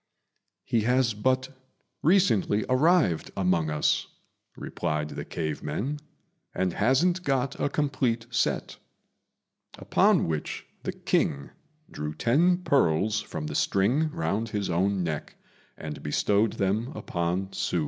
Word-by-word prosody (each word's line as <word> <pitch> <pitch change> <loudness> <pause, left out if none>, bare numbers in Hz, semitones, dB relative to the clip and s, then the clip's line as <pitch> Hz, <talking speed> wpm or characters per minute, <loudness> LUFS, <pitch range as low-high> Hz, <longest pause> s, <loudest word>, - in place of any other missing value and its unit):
"He 120 -3 +1
has 125 +1 +2
but 130 +5 +1 0.5
recently 145 - +3
arrived 145 - +3
among 90 -4 +1
us," 75 0 +1 0.5
replied 75 0 -3
the - - -6
cave 80 -3 -4
men, 145 +6 -3 0.6
"and 90 -1 0
hasn't 160 - +2
got 135 -4 -1
a - - +1
complete 130 -5 0
set;" 120 - -1 1.0
upon - - +3
which 80 -2 -3 0.2
the - - -3
King 70 -1 -1 0.4
drew 75 0 -5
ten 175 - +2
pearls 105 - +2
from 80 -6 -6
the 75 - -4
string 120 - +2
round 115 - -2
his 100 -3 -2
own 95 +2 +1
neck 80 -3 -4 0.4
and 75 -1 -7
bestowed 100 +8 +1
them 100 +4 0
upon 90 +3 -2
Hsü. 95 -2 -1
105 Hz, 120 wpm, -27 LUFS, 85-130 Hz, 1.0 s, recently